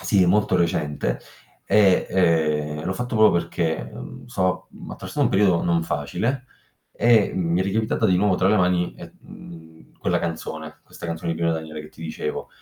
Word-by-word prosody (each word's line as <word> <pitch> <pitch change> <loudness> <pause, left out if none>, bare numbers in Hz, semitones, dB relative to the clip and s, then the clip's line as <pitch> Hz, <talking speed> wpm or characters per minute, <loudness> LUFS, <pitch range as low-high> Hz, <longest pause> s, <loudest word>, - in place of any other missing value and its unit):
Sì, 95 -3 +3
molto 100 0 +3
recente, 75 -7 -1 0.4
e, 100 -4 +4
ehm, 75 -4 +1
l'ho 95 - -1
fatto 125 +1 -4
proprio 110 0 +6
perché, 80 -6 -2
uhm, - - -9
so 95 -7 -1
uhm, - - -11
attraversa - - -6
un - - +4
periodo 95 -3 +3
non 85 -1 +1
facile, 95 - -2 0.4
e 115 -3 +3
mi 85 0 0
è - - +3
ricapitata 110 +3 0
di 90 -2 +3
nuovo 100 0 +3
tra 95 +1 +2
le 105 - +4
mani, 90 -1 +1
e - - -11
mhmm, 80 -1 -14
quella - - 0
canzone, 80 -2 -5
questa - - -13
canzone 85 0 -3
di - - -5
Pino 85 -1 +2
Daniele, 80 -1 -5
che 75 - -11
ti 80 - -13
dicevo. 80 - -4
85 Hz, 180 wpm, -23 LUFS, 80-100 Hz, 0.4 s, proprio